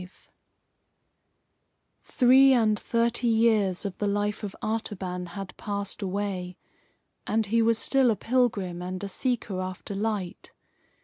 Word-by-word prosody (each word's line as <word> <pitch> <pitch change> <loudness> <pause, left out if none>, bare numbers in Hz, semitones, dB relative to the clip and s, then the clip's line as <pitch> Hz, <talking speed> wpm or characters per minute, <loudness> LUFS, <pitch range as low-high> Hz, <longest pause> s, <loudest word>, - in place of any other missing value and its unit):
V 180 - -10 1.9
Three 265 +1 +5
and 220 -4 +2
thirty 235 +1 0
years 220 -5 +2
of 195 -2 -5
the 205 - 0
life 205 +1 -1
of 205 -2 -6
Artaban 190 -5 -3
had 195 -2 -7
passed 200 -1 -3
away, 190 -2 -3 0.7
and 220 +1 +1
he 230 +3 +2
was 225 0 +3
still 265 +1 +3
a 225 - +2
pilgrim 205 -7 0
and 185 +2 -5
a - - -2
seeker 210 -3 -2
after 185 +2 -6
light. 200 -3 -4
205 Hz, 130 wpm, -27 LUFS, 190-230 Hz, 1.9 s, Three